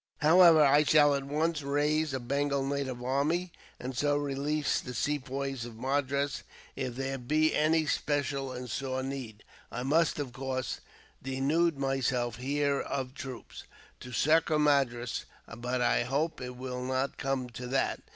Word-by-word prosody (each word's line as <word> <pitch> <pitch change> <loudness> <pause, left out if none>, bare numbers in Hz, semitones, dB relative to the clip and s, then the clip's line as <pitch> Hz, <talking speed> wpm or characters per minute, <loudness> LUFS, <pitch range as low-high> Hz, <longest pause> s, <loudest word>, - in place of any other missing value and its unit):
"However, 160 0 +7
I 145 +2 +5
shall 145 -1 +5
at 140 -1 -2
once 155 +2 0
raise 150 +2 +1
a 130 - -2
Bengal 140 +2 0
native 135 -3 -3
army, 150 +8 0 0.3
and 130 +1 -5
so 145 +3 +2
release 145 +1 -1
the 125 -1 -7
Sepoys 135 -2 -2
of 120 -1 -8
Madras. 140 +3 -1 0.3
If 130 -3 -3
there 135 +1 -3
be 155 +5 +2
any 155 +1 +3
special 145 -3 -1
and 125 0 -6
sore 130 +3 -3
need, 130 -6 -6 0.3
I 125 - -4
must, 155 +5 +2
of 140 -4 -4
course, 130 0 -3 0.4
denude 140 +5 +1
myself 130 -3 0
here 140 +2 0
of 130 -2 -3
troops, 130 -4 -8 0.3
to 125 - -9
succour 155 +5 +3
Madras; 135 -5 +1 0.3
but 125 +2 -2
I 120 - +3
hope 140 +7 -1
it 125 0 -6
will 125 0 -5
not 130 +2 -1
come 135 -2 -2
to 125 +2 -7
that. 135 +2 0
135 Hz, 150 wpm, -30 LUFS, 130-145 Hz, 0.4 s, However